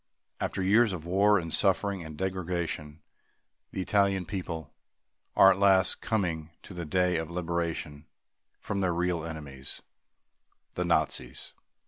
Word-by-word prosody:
After 95 - -2
years 105 +2 +4
of 85 -3 -6
war 100 +4 +4
and 85 -3 -3
suffering 95 -1 +1
and 80 -1 -9
degradation, 85 -5 -3 0.7
the 95 - -4
Italian 100 -2 +2
people 85 -4 -5 0.6
are 95 - +8
at 95 - 0
last 95 -2 +4
coming 85 -8 -1
to - - -10
the 85 -2 -5
day 90 +2 +2
of 80 -1 -3
liberation 85 -3 -3 0.5
from 100 -1 -3
their 90 -3 +1
real 85 -2 0
enemies, 75 -5 -7 0.9
the 90 - -1
Nazis. 75 -7 0
90 Hz, 130 wpm, -29 LUFS, 80-95 Hz, 0.9 s, are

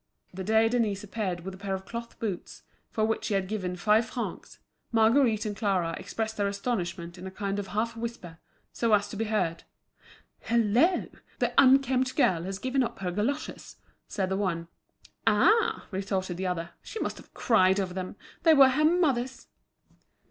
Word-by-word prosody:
The 190 +1 -5
day 220 +3 +4
Denise 225 -4 0
appeared 195 -4 -3
with 190 +2 -6
a - - -10
pair 195 -1 -2
of 190 0 -8
cloth 235 +1 -7
boots, 200 -6 -5 0.3
for 215 - 0
which 220 0 -1
she 205 - 0
had 190 -1 0
given 185 -3 -3
five 210 +5 +3
francs, 240 - -5 0.3
Marguerite 225 0 +3
and 210 -1 -3
Clara 190 -6 0
expressed 220 +3 -4
their 205 -1 +1
astonishment 180 -5 -3
in 185 - -7
a - - -4
kind 200 +1 -3
of 200 - -4
half 225 +3 -2
whisper, 225 -8 -6 0.3
so 230 -2 +1
as 205 0 0
to - - -7
be 225 +2 -1
heard. 185 -6 -1 0.9
"Hullo! 235 - +3 0.3
the - - 0
'unkempt 260 -1 +4
girl' 180 - +2
has 190 0 -4
given 260 +5 0
up 240 - -2
her 185 -2 -3
goloshes," 235 +11 -3 0.3
said 190 -2 -2
the 190 - 0
one. 170 -4 -2 0.6
"Ah," 455 +1 +3
retorted 190 -2 -2
the 190 0 -2
other, 170 -1 -3
"she 445 - -7
must - - -3
have - - -15
cried 190 -4 +3
over 185 -2 -2
them. 185 +1 -5 0.3
They 320 -1 +6
were 270 -2 +8
her 300 +4 +2
mother's." 280 -7 +1
210 Hz, 175 wpm, -28 LUFS, 190-235 Hz, 0.9 s, were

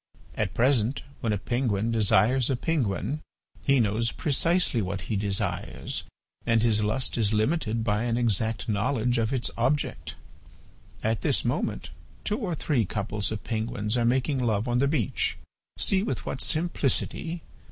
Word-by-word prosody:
At 100 -2 -2
present 125 +1 +2 0.2
when 115 - -1
a 105 - +1
penguin 115 -1 0
desires 115 +4 +3
a 135 - +2
penguin 125 - -1 0.4
he 140 -2 +4
knows 115 +1 +1
precisely 165 -3 +2
what 95 0 -3
he 110 - -3
desires 100 -1 -2 0.4
and 115 -1 +2
his 110 -2 +3
lust 120 +4 0
is 110 -1 +3
limited 110 0 +1
by 105 +1 0
an 120 -1 0
exact 110 -2 0
knowledge 120 +3 +1
of 110 0 0
its 130 -3 +1
object. 140 +5 0 0.9
At 110 0 0
this - - +1
moment - - -2 0.3
two 210 +3 -1
or 185 -9 -2
three 140 -5 +1
couples 100 +1 -2
of 110 - -4
penguins 110 -1 -2
are 120 - +2
making 130 +3 +1
love 110 -1 0
on 120 0 +1
the 140 - +3
beach. 140 -8 0 0.4
See 190 -1 +4
with 215 - -3
what 135 - -3
simplicity! 165 +1 -1
115 Hz, 150 wpm, -27 LUFS, 105-135 Hz, 0.9 s, he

